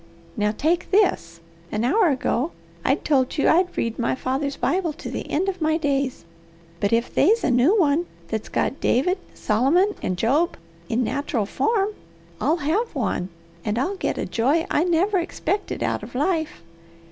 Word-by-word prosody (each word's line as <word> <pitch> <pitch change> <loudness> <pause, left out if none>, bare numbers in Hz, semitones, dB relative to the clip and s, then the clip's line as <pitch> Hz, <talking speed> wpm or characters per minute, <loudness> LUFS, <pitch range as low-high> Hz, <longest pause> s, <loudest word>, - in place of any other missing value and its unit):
Now 210 -2 +1
take 315 +10 0
this! 265 - +1 0.3
An 215 +1 -1
hour 350 - +3
ago 270 +2 0 0.3
I'd - - +1
told 270 -1 +2
you 285 - +2
I'd 355 +2 +3
read 230 +1 -1
my 235 - +1
father's 270 +2 -2
Bible 350 -3 0
to 310 - -8
the - - -5
end 360 +6 0
of 375 -2 -3
my 315 0 +2
days. 275 - -1 0.5
But 200 - 0
if 230 +1 +1
they's 435 +10 +3
a 280 - +2
new 270 - +4
one 325 +1 +2 0.2
that's 220 -1 -3
got 270 - -1
David, 360 +10 +2 0.2
Solomon, 285 - +2
and 185 - -2
Job 285 - +1 0.3
in 235 +2 +1
nateral 255 -3 -1
form, 415 - +1 0.5
I'll 320 - +2
have 395 +7 0
one, 195 -7 -1 0.3
and 210 +1 -1
I'll 320 +11 0
git - - -2
a - - -2
joy 280 +8 +1
I 315 - +2
never 365 +3 +2
expected 395 +4 -2
out - - -1
of - - -10
life. 305 - -1
290 Hz, 170 wpm, -23 LUFS, 245-355 Hz, 0.5 s, new